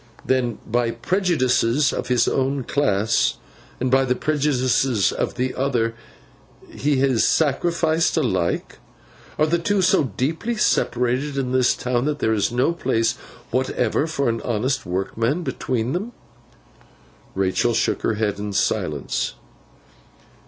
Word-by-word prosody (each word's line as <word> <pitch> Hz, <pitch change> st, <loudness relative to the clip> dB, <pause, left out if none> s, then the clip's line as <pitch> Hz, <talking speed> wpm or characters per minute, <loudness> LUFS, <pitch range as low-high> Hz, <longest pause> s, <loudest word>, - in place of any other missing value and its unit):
'Then, 125 Hz, -4 st, 0 dB
by 120 Hz, +1 st, 0 dB
the 115 Hz, -, -5 dB
prejudices 135 Hz, -, +1 dB
of -, -, -3 dB
his 125 Hz, -2 st, +2 dB
own 135 Hz, 0 st, 0 dB
class, 110 Hz, -6 st, +1 dB, 0.4 s
and 130 Hz, 0 st, -1 dB
by 135 Hz, 0 st, +4 dB
the 125 Hz, -1 st, 0 dB
prejudices 130 Hz, -6 st, +1 dB
of -, -, -2 dB
the 130 Hz, +1 st, -1 dB
other, 120 Hz, -4 st, 0 dB, 0.8 s
he 140 Hz, +4 st, 0 dB
is 130 Hz, -5 st, +3 dB
sacrificed 160 Hz, +2 st, +1 dB
alike? 95 Hz, -, -1 dB, 0.6 s
Are 155 Hz, -, +3 dB
the 170 Hz, +2 st, +1 dB
two 195 Hz, +3 st, +1 dB
so 170 Hz, -, +3 dB
deeply 160 Hz, -, -2 dB
separated 130 Hz, -, 0 dB
in 130 Hz, -2 st, -1 dB
this 130 Hz, -1 st, +3 dB
town, 125 Hz, 0 st, -1 dB
that 150 Hz, 0 st, -1 dB
there 110 Hz, -5 st, +1 dB
is 105 Hz, +1 st, 0 dB
no 125 Hz, +7 st, +1 dB
place 115 Hz, -7 st, 0 dB, 0.4 s
whatever 130 Hz, +2 st, 0 dB
for 160 Hz, -4 st, -1 dB
an 115 Hz, -1 st, -1 dB
honest 120 Hz, -1 st, -1 dB
workman 115 Hz, -, -1 dB
between 125 Hz, -5 st, -2 dB
them?' 210 Hz, +7 st, -3 dB, 1.2 s
Rachael 95 Hz, +5 st, +1 dB
shook -, -, 0 dB
her 115 Hz, -, 0 dB
head 105 Hz, -2 st, -1 dB
in 105 Hz, 0 st, -4 dB
silence. 100 Hz, -, -1 dB
130 Hz, 135 wpm, -22 LUFS, 115-145 Hz, 1.2 s, by